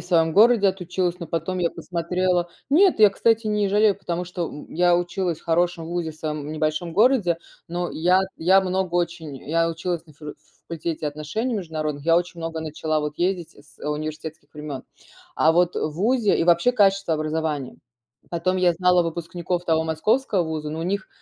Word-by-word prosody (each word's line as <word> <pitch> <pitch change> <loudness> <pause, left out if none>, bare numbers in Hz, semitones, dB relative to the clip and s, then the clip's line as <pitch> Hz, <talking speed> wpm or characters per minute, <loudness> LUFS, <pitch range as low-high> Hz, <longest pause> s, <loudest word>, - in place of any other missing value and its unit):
в - - -11
своем 165 -3 +2
городе 220 -1 +6
отучилась, 180 -1 -2
но 170 - -5
потом 165 +3 -2
я 170 -2 +1
посмотрела 180 0 -1 0.2
нет, 345 - +4
я, 210 - +9
кстати, 225 +3 +1
не 210 -1 +1
жалею, 210 0 +4
потому 175 -2 -3
что, 175 -1 -3
м, 150 - -10
я 175 +1 +3
училась 175 -1 -1
в - - -24
хорошем 170 0 +1
вузе 170 -1 -3
в 155 - -14
своем 150 -1 -4
небольшом 155 +2 -2
городе, 210 -5 +3 0.3
но 175 +1 -3
и - - -8
я 180 +3 +4 0.2
я 190 +4 +4
много 185 -1 -2
очень 170 -4 -2
я 165 +1 +2
училась 170 +1 -3
на 155 - -16
фило 150 0 -9
ф - - -25 0.3
факультете 165 -1 -3
отношений 155 - -3
международных, 155 -6 -4
я 165 - +4
очень 175 -1 -6
много 165 0 -4
начала 155 0 -2
вот 150 0 -4
ездить, 175 -2 -1
э, - - -16
с, - - -23
э, - - -8
университетских 155 +1 -5
времен, 150 -3 -6 0.5
а 160 - +4
вот, 175 +1 +2
э, - - -1
вузе 210 - +1
и - - +2
вообще 170 +7 +4
качество 195 -6 +3
образования. 155 -3 -2 0.5
Потом 185 +2 0
я 180 -1 +4
знала 180 0 +3
выпускников 170 +1 -3
того 160 -1 +2
московского 195 +5 +1
вуза, 155 -2 -4
ну 160 +1 -4
у - - -2
них 200 +4 -2
170 Hz, 190 wpm, -23 LUFS, 160-185 Hz, 0.5 s, я